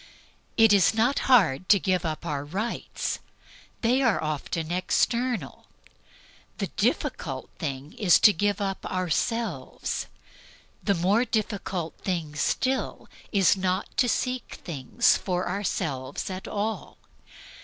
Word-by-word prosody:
It 225 Hz, -2 st, +7 dB
is 200 Hz, +1 st, +4 dB
not 240 Hz, +5 st, +2 dB
hard 185 Hz, -, +4 dB
to 200 Hz, -, +7 dB
give 185 Hz, -1 st, 0 dB
up 160 Hz, 0 st, -3 dB
our 145 Hz, -4 st, -2 dB
rights. 195 Hz, +10 st, -3 dB, 0.6 s
They 245 Hz, +3 st, +3 dB
are 235 Hz, -6 st, +3 dB
often 155 Hz, +2 st, -3 dB
eternal. 225 Hz, -, 0 dB, 0.9 s
The -, -, -2 dB
difficult -, -, -2 dB
thing 135 Hz, +2 st, -4 dB
is 190 Hz, -5 st, +4 dB
to 210 Hz, -, +8 dB
give 205 Hz, +3 st, 0 dB
up 195 Hz, -1 st, -2 dB
ourselves. 185 Hz, -, -2 dB, 0.7 s
The 200 Hz, -, +1 dB
more 195 Hz, +7 st, +3 dB
difficult 200 Hz, -7 st, -2 dB
thing 170 Hz, -6 st, -3 dB
still 260 Hz, -, -1 dB, 0.2 s
is 195 Hz, -2 st, +4 dB
not 185 Hz, 0 st, -2 dB
to 250 Hz, -3 st, +3 dB
seek 250 Hz, +1 st, -2 dB
things 165 Hz, -, +2 dB
for 180 Hz, -1 st, -2 dB
ourselves 160 Hz, -7 st, -3 dB
at 185 Hz, 0 st, -6 dB
all. 215 Hz, +2 st, -3 dB
190 Hz, 120 wpm, -26 LUFS, 165-225 Hz, 0.9 s, to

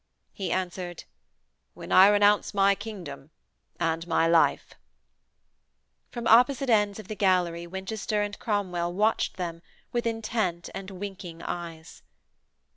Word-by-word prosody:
He 190 Hz, -3 st, -4 dB
answered: 180 Hz, -2 st, -3 dB, 0.7 s
'When -, -, -9 dB
I 190 Hz, +1 st, +8 dB
renounce 205 Hz, 0 st, +3 dB
my 200 Hz, 0 st, +5 dB
kingdom 185 Hz, -10 st, -8 dB, 0.5 s
and 165 Hz, 0 st, -1 dB
my 165 Hz, -1 st, +2 dB
life!' 165 Hz, -1 st, +2 dB, 1.4 s
From 240 Hz, -1 st, -6 dB
opposite 250 Hz, +3 st, +4 dB
ends 210 Hz, -2 st, +3 dB
of 215 Hz, -3 st, -10 dB
the 215 Hz, -, -4 dB
gallery 180 Hz, -4 st, +1 dB
Winchester 195 Hz, +3 st, -3 dB
and 205 Hz, -1 st, -5 dB
Cromwell 180 Hz, -5 st, -1 dB
watched 215 Hz, +2 st, +1 dB
them 170 Hz, -2 st, -4 dB, 0.3 s
with 240 Hz, -1 st, -1 dB
intent 220 Hz, -6 st, -2 dB
and 195 Hz, 0 st, -7 dB
winking 190 Hz, -3 st, -8 dB
eyes. 165 Hz, -2 st, -7 dB
190 Hz, 120 wpm, -27 LUFS, 170-210 Hz, 1.4 s, I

